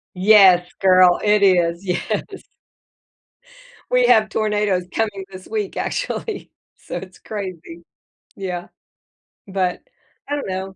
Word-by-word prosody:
Yes, 185 -2 +6
girl, 185 -2 +5
it 210 0 +3
is, 175 -1 +2
yes. 180 -1 -2 1.7
We - - +3
have 215 -1 +4
tornadoes 210 -4 0
coming 210 -3 -2
this 185 -1 -11
week, 425 -3 -4
actually, 455 -4 -4 0.3
so - - -8
it's 185 +1 -9
crazy. 180 -5 -8 0.5
Yeah, 180 -3 -5 0.8
but, 185 -2 -2 0.5
I 290 - -2
don't 290 - -4
know. 190 +1 -5
190 Hz, 110 wpm, -20 LUFS, 180-210 Hz, 1.7 s, Yes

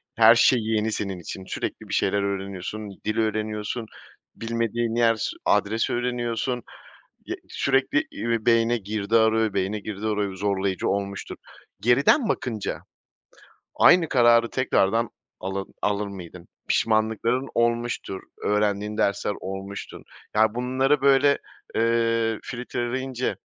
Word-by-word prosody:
Her 115 +1 +7
şey 120 +2 +5
yeni 110 0 0
senin 100 -3 -3
için. 95 +2 -8
Sürekli - - -5
bir - - -4
şeyler 100 +1 +1
öğreniyorsun, 100 +1 -4 0.2
dil 110 +1 -1
öğreniyorsun, 110 +1 -2 0.5
bilmediğin 115 0 -1
yer 115 -1 +4
s 110 - -2 0.2
adres 110 +3 +2
öğreniyorsun. 120 0 -1 0.6
Y - - -3
sürekli, 140 - +1
iii, 115 - -2
beyine 115 0 +4
girdi 105 0 -1
arıyor, 110 -1 +3
beyine 100 +2 -1
girdi 105 +1 -5
arıyor, 105 -2 -1
zorlayıcı 95 -1 -1
olmuştur. 100 0 -3 0.4
Geriden 140 - +4
bakınca 115 - -2 1.0
aynı 175 -3 +6
kararı 120 -3 +4
tekrardan 115 -3 +1 0.3
ala 95 +1 -3 0.2
alır 105 0 0
mıydın? 90 -3 -10 0.2
Pişmanlıkların 115 +4 +1
olmuştur, 120 -4 0 0.2
öğrendiğin 105 0 0
dersler 100 -1 +1
olmuştur. 95 +1 -7 0.3
Yani, 110 0 +3
bunları 130 +3 +1
böyle, 140 +1 +5 0.4
eee, 115 -1 +1
filtreleyince 125 +1 -3
110 Hz, 115 wpm, -25 LUFS, 100-120 Hz, 1.0 s, Her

